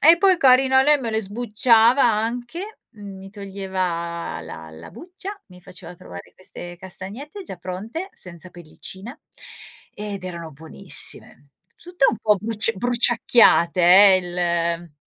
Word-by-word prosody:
e 325 +3 +7
poi 375 0 +3
carina 265 -1 +5
lei 295 +1 +4
me 235 -3 -4
le 220 0 0
sbucciava 230 +4 +3
anche, 240 - -2
mi 195 -3 -11
toglieva 185 - -4
la 80 0 -10
la 80 +2 -12
buccia, 370 +3 -9
mi 180 -1 -16
faceva 180 0 -12
trovare 90 - -12
queste 175 -1 -10
castagnette 210 - -8
già 190 - -9
pronte 205 - -6
senza 180 0 -9
pellicina, 180 - -10 0.7
ehm, 210 0 -6
ed 190 -2 -8
erano 170 -3 -7
buonissime. 145 -2 -2 0.3
Tutte 350 -5 0
un - - 0
po' 210 0 +2
bruc 220 +2 -1
bruciacchiate 235 -6 +3
eh, 190 +2 +7
il 170 -2 -2
200 Hz, 130 wpm, -22 LUFS, 175-245 Hz, 0.7 s, e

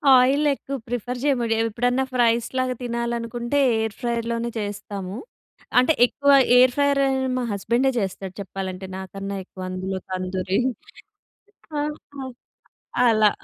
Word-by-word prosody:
Oil 265 +4 +4
ఎక్కువ 275 0 -5
prefer 245 +1 -3
చేయమండి. 240 -6 +2
ఎప్పుడన్నా 245 +3 +1
ఫ్రైస్‌ 235 -2 +3
లాగా 255 0 +1
తినాలనుకుంటే, 235 +2 -2 0.2
ఎయిర్ 220 -1 -2
ఫ్రైయర్‌ 235 -1 -1
లోనె 235 0 -1
చేస్తాము. 205 -2 -5 0.6
అంటే, 255 +6 +4
ఎక్కువ 280 +3 +2 0.3
ఎయిర్ 250 0 +6
ఫ్రైయర్ 285 -1 +3 0.4
మా 250 - -1
హస్బెండే 235 +6 +1
చేస్తాడు. 190 -1 -4
చెప్పాలంటే, 190 0 -5
నాకన్నా 195 +1 -5
ఎక్కువ 185 0 -8
అందులో 185 +1 -3
తందూరి 185 +1 -1 1.2
ఆ! - - +1 0.4
ఆ! 265 - -4 0.8
అలా 215 -2 +5
230 Hz, 120 wpm, -23 LUFS, 195-250 Hz, 1.2 s, ఎయిర్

